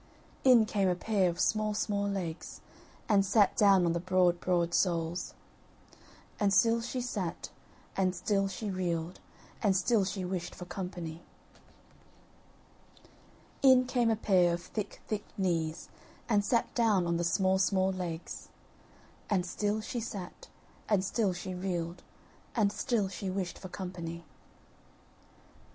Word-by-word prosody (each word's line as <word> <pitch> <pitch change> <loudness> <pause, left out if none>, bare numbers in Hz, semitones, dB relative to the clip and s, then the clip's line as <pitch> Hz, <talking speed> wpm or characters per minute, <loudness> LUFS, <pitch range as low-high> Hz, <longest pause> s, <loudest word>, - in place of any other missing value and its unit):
In 245 -4 +7
came 200 -3 +1
a 180 - +1
pair 195 0 +1
of 170 +1 -5
small 215 +1 +1
small 200 -1 0
legs, 180 -4 -5 0.5
and 200 -3 +4
sat 200 +1 +3
down 195 -3 +5
on 170 - +2
the 170 - -1
broad 180 -1 +2
broad 175 -2 +1
soles; 170 -1 0 1.0
And 205 -1 +3
still 230 +4 +4
she 250 +2 -3
sat, 205 -8 -4 0.4
and 185 -1 +1
still 195 +2 +1
she 200 +2 -4
reeled, 175 -2 -2 0.4
and 195 -3 +3
still 205 +3 +3
she 190 0 -3
wished 180 -1 -4
for 180 - -8
company. 175 -3 -6 2.4
In 260 -2 +6
came 245 -2 +1
a 225 - +3
pair 180 -5 +3
of 175 - -9
thick 210 -2 -5
thick 210 -1 -3
knees, 165 -4 -1 0.4
and 210 -3 +3
sat 235 +3 +1
down 215 -7 +3
on 170 0 0
the 170 - -1
small 190 +2 +2
small 190 0 +2
legs; 175 -3 -5 0.8
And 185 -4 +1
still 205 +3 -1
she 240 +3 -4
sat, 200 -5 -7 0.4
and 200 -3 +2
still 200 0 +1
she 180 +1 -5
reeled, 175 -2 -3 0.5
and 210 -4 +3
still 215 -2 0
she 190 0 -5
wished 185 -1 -3
for 185 - -8
company. 170 -3 -6
190 Hz, 140 wpm, -31 LUFS, 175-210 Hz, 2.4 s, In